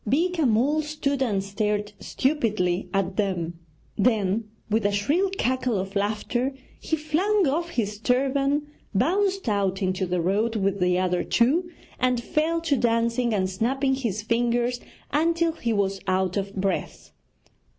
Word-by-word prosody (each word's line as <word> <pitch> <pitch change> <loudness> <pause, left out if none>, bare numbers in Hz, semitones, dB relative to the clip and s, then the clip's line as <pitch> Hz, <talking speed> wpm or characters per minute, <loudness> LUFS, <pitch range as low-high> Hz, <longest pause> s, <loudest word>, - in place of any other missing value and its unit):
Beeka 330 - +2
Mull 260 +8 +2
stood 295 -2 -2
and 205 -7 +1
stared 210 +1 -2
stupidly 215 - 0
at 195 -1 -1
them; 175 -5 -1 0.4
then, 215 -1 +1 0.2
with 220 +1 +1
a 205 - +2
shrill 290 - +1
cackle 255 -3 0
of 190 +2 -4
laughter, 220 +6 -1 0.2
he 320 - -1
flung 335 +6 +1
off 335 +5 0
his 210 -9 -2
turban, 275 +4 +1 0.3
bounced 390 - +1
out 195 -3 +1
into 185 -1 -1
the 180 0 0
road 205 +7 +1
with 195 -1 0
the 180 0 +2
other 180 -1 +1
two, 310 +10 +2 0.3
and 250 -1 +2
fell 330 +3 0
to 330 -4 +1
dancing 235 0 +1
and 190 -3 +1
snapping 265 +8 0
his 225 -6 -2
fingers 240 +2 +1 0.3
until 330 +2 +2
he 240 -8 -3
was 195 -2 0
out 185 -1 +1
of 200 0 -3
breath. 195 0 -3
230 Hz, 145 wpm, -25 LUFS, 195-280 Hz, 0.4 s, Beeka